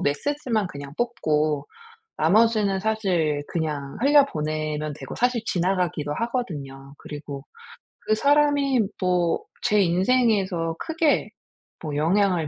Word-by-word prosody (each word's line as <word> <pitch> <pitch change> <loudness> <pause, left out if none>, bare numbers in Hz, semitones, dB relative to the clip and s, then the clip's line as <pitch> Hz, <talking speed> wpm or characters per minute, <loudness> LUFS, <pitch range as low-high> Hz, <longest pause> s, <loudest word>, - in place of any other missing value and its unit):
메시지만 225 - -1
그냥 140 -3 -8
뽑고 155 -11 0 0.5
나머지는 210 +2 +3
사실 185 -9 0
그냥 150 -3 -3
흘려 285 +1 +6
보내면 155 - -3
되고 - - -8
사실 245 -1 +1
지나가기도 175 -6 0
하거든요. 145 - -4
그리고 145 -2 -8 0.6
그 215 - +1
사람이 285 -1 +3 0.2
뭐 180 -2 +2 0.3
제 210 -1 +4
인생에서 190 -3 +2
크게 320 -2 +1 0.5
뭐 150 -3 -4
영향을 175 0 +2
180 Hz, 255 characters per minute, -24 LUFS, 150-230 Hz, 0.6 s, 흘려